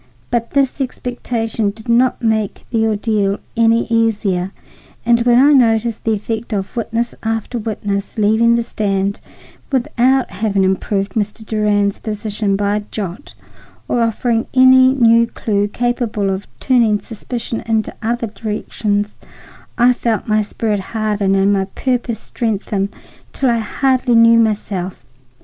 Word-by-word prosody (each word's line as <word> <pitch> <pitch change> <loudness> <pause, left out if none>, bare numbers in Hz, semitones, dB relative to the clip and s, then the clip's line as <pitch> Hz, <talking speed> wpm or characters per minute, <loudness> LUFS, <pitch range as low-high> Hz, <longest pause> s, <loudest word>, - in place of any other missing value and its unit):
But 235 -1 0
this 275 0 0
expectation 235 -4 -2
did 220 +3 -10
not 245 +1 +2
make 220 -3 -1
the 225 -2 +2
ordeal 210 -2 0 0.2
any 230 0 +3
easier, 205 -5 0 0.5
and 235 0 +4
when 240 0 +4
I 285 +4 +6
noticed 230 -3 +2
the 225 - +2
effect 220 +2 -4
of 195 +2 -3
witness 235 0 -2
after 225 +2 -2
witness 205 -2 -3
leaving 220 +2 +3
the 235 - +1
stand 200 -3 -2 0.5
without 260 0 +1
having 195 0 0
improved 195 +1 0
Mr. 215 +1 -3
Durand's 205 -2 +1
position 210 -2 -2
by 205 +1 0
a 210 - -4
jot 200 +5 -6 0.5
or 240 - 0
offering 230 0 0
any 260 0 +7
new 230 -2 +5
clue 205 -3 -1
capable 230 -3 -1
of 190 +1 -4
turning 235 -5 +3
suspicion 230 +1 -5
into 220 -1 0
other 235 +1 -1
directions, 210 -1 -3 0.6
I 245 +1 +5
felt 230 -2 -2
my 215 0 +2
spirit 210 0 -2
harden 205 -1 -1
and 195 +1 +3
my 195 -1 +1
purpose 240 +3 -2
strengthen 205 -3 -2 0.4
till 265 -3 +1
I 235 - +1
hardly 255 +2 +1
knew 230 0 +6
myself. 195 - -2
220 Hz, 135 wpm, -17 LUFS, 205-235 Hz, 0.6 s, any